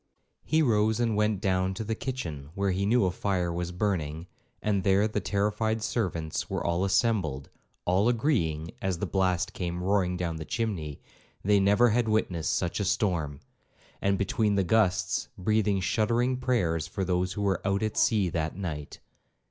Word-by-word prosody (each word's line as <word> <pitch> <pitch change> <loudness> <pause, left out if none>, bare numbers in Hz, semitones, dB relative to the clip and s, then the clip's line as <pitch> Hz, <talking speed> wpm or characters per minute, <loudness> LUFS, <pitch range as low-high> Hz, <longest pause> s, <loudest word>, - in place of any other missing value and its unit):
He 160 0 +2
rose 110 -3 +2
and 115 -3 +1
went 105 -2 +1
down 95 -1 +1
to 110 - -4
the 110 +1 -2
kitchen, 95 - -5
where 100 -1 +1
he 95 +2 0
knew 115 -1 +4
a 90 - +1
fire 90 -2 -1
was 90 0 -3
burning, 85 -5 -2 0.3
and 100 -3 0
there 100 +2 +3
the 105 -1 -2
terrified 105 +3 0
servants 85 -10 -2
were - - -2
all 85 +2 +1
assembled, 95 - +1 0.3
all 95 +6 +3
agreeing, 85 - 0
as 95 -2 -1
the - - -2
blast 90 -2 0
came 90 -1 -3
roaring 95 -2 +1
down 85 -2 -2
the 80 - -5
chimney, 85 - -3 0.4
they 100 +1 +4
never 105 +5 +4
had 115 0 +1
witnessed 90 -7 0
such 90 +2 -1
a - - +1
storm, 85 -8 0 0.6
and 100 0 +2
between 105 +1 +1
the 100 - +2
gusts, 95 -2 +1
breathing 105 +1 +1
shuddering 115 +6 +1
prayers 90 -12 0
for 95 +2 -3
those 90 0 0
who 105 - -3
were 95 -3 +1
'out 100 +2 0
at 110 -1 -1
sea 105 -5 +3
that 80 -2 -2
night.' 80 -7 -5
95 Hz, 170 wpm, -28 LUFS, 90-110 Hz, 0.6 s, knew